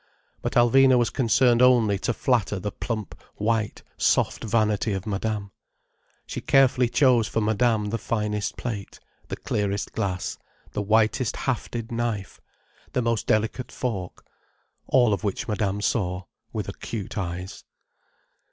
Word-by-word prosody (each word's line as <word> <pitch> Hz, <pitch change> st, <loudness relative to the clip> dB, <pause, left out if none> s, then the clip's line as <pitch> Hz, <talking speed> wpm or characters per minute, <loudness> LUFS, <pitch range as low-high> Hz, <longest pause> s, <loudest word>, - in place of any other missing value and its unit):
But -, -, -2 dB
Alvina 130 Hz, +2 st, +6 dB
was 120 Hz, -2 st, +2 dB
concerned 120 Hz, -1 st, +3 dB
only 115 Hz, -6 st, +5 dB
to 120 Hz, -, 0 dB
flatter 115 Hz, -4 st, +1 dB
the 105 Hz, +2 st, -3 dB
plump, 110 Hz, -2 st, -4 dB, 0.2 s
white, 110 Hz, 0 st, -1 dB
soft -, -, +2 dB
vanity 110 Hz, -1 st, +1 dB
of 95 Hz, 0 st, -4 dB
Madame. 105 Hz, -1 st, -2 dB, 0.7 s
She -, -, -5 dB
carefully 130 Hz, -3 st, +4 dB
chose 125 Hz, -5 st, +4 dB
for -, -, -1 dB
Madame 110 Hz, 0 st, +1 dB
the 115 Hz, -, -1 dB
finest 105 Hz, -2 st, -2 dB
plate, 105 Hz, -5 st, -5 dB, 0.3 s
the -, -, -4 dB
clearest 100 Hz, -1 st, -2 dB
glass, 95 Hz, -4 st, -2 dB, 0.3 s
the -, -, -2 dB
whitest 110 Hz, +3 st, +2 dB
hafted 120 Hz, -2 st, -3 dB
knife, 115 Hz, -4 st, -3 dB, 0.5 s
the 125 Hz, -, +1 dB
most 115 Hz, -2 st, 0 dB
delicate 110 Hz, +4 st, 0 dB
fork. 100 Hz, -8 st, -4 dB, 0.6 s
All 120 Hz, -5 st, +4 dB
of 100 Hz, -, -3 dB
which 100 Hz, -2 st, -2 dB
Madame 105 Hz, -2 st, -1 dB
saw, 90 Hz, -4 st, 0 dB, 0.3 s
with -, -, -4 dB
acute 105 Hz, -5 st, -6 dB
eyes. 90 Hz, -1 st, -5 dB
110 Hz, 135 wpm, -25 LUFS, 100-120 Hz, 0.7 s, Alvina